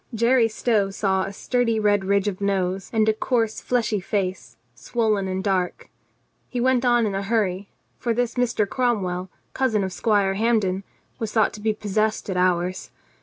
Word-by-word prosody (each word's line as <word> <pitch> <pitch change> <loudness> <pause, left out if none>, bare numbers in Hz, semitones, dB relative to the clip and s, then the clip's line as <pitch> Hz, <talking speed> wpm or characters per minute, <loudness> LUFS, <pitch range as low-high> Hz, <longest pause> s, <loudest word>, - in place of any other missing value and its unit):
Jerry 235 +1 +4
Stow 215 -2 +1
saw 195 -1 0
a 195 - -5
sturdy 230 +2 0
red 205 -2 +2
ridge 200 +1 +2
of 200 -1 -3
nose 190 -1 -1
and 220 -1 +2
a 220 - +4
coarse 225 0 -1
fleshy 230 -4 0
face, 190 -1 -3 0.2
swollen 215 -5 -1
and 190 0 -2
dark. 185 -3 -1 0.6
He 250 - -3
went 255 0 +2
on 240 -2 +3
in 205 - -1
a 195 - -1
hurry, 200 -2 -1 0.3
for 240 - -1
this 240 +1 0
Mr. 235 -4 +1
Cromwell, 190 -7 -1 0.2
cousin 225 -6 +1
of 190 -1 -3
Squire 205 -4 +2
Hampden, 200 -3 +1 0.4
was 225 -2 -3
thought 220 -2 +2
to 210 - -9
be 215 0 0
possessed 215 0 -1
at - - -2
hours. 180 0 0
210 Hz, 170 wpm, -23 LUFS, 195-230 Hz, 0.6 s, Jerry